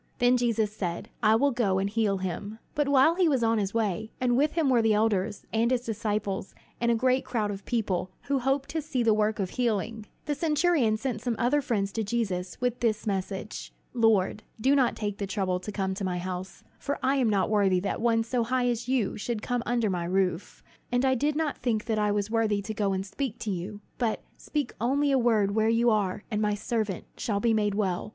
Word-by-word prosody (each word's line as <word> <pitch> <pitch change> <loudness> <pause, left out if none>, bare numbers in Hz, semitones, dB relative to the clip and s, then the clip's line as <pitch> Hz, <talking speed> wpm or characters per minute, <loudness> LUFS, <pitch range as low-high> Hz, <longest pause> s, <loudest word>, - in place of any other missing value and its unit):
Then 245 +1 +4
Jesus 225 -4 0
said, 175 -5 -4
"I 215 -1 +5
will 280 +5 +3
go 220 -6 +1
and 195 +1 +1
heal 205 -2 +1
him." 190 +3 -4 0.2
But 295 -1 0
while 280 +3 +5
he 355 -1 +3
was 265 -5 +1
on 225 -1 +2
his 195 -1 -1
way 220 -1 -1
and 245 -1 +2
with 295 +4 +2
him 325 -3 +1
were 250 -3 +4
the 220 -1 +3
elders, 210 -1 0
and 225 +1 +2
his 250 -1 0
disciples, 210 -3 -2 0.2
and 235 - +1
a 235 - +4
great 255 +2 +2
crowd 215 -4 -1
of 195 -1 -7
people, 195 -6 -1
who 280 -1 0
hoped 270 +2 0
to 320 +2 -2
see 275 -5 -1
the 225 -1 +4
work 215 0 +1
of 190 -4 -2
healing 225 -2 -1 0.2
the 295 - 0
centurion 300 -7 +2
sent 230 -2 -3
some 240 -1 -1
other 270 +5 +2
friends 210 -8 -1
to 225 - -2
Jesus 195 -5 -2
with 245 -1 -1
this 220 -3 0
message: 195 0 -4 0.2
"Lord, 220 -4 +2 0.2
do 270 +5 +3
not 260 -4 +3
take 205 -1 -4
the 200 - -2
trouble 190 -2 -1
to 200 +3 -6
come 190 -2 -1
to 195 - -5
my 180 -1 -1
house; 180 +1 -6 0.2
for 285 - -2
I 270 +2 +2
am 250 -4 +2
not 200 -1 +1
worthy 195 -3 +3
that 200 - -2
one 225 -1 +3
so 235 +1 0
high 250 +1 +1
as 235 0 -2
you 250 -6 +1
are - - -7
should 220 +1 -3
come 245 -1 -1
under 235 -4 +1
my 175 -2 -2
roof; 185 -1 -1 0.3
and 245 +2 +2
I 260 - +4
did 290 +4 0
not 305 -2 -1
think 225 -4 -1
that 220 -2 0
I 210 0 +2
was 205 +1 -1
worthy 215 -3 +1
to 220 - -4
go 205 -2 0
and 190 0 -2
speak 225 +4 -4
to 215 - -2
you. 195 +3 -5 0.2
But 230 -3 0
speak 290 -5 -3
only 280 +4 +2
a 270 - +4
word 220 -5 +3
where 220 +1 +2
you 230 +1 +3
are, 205 -2 0
and 210 0 0
my 210 -1 +1
servant 210 -3 -2
shall 205 -3 -1
be 230 +1 +2
made 210 -2 +1
well. 195 -2 -1
220 Hz, 230 wpm, -27 LUFS, 200-245 Hz, 0.3 s, I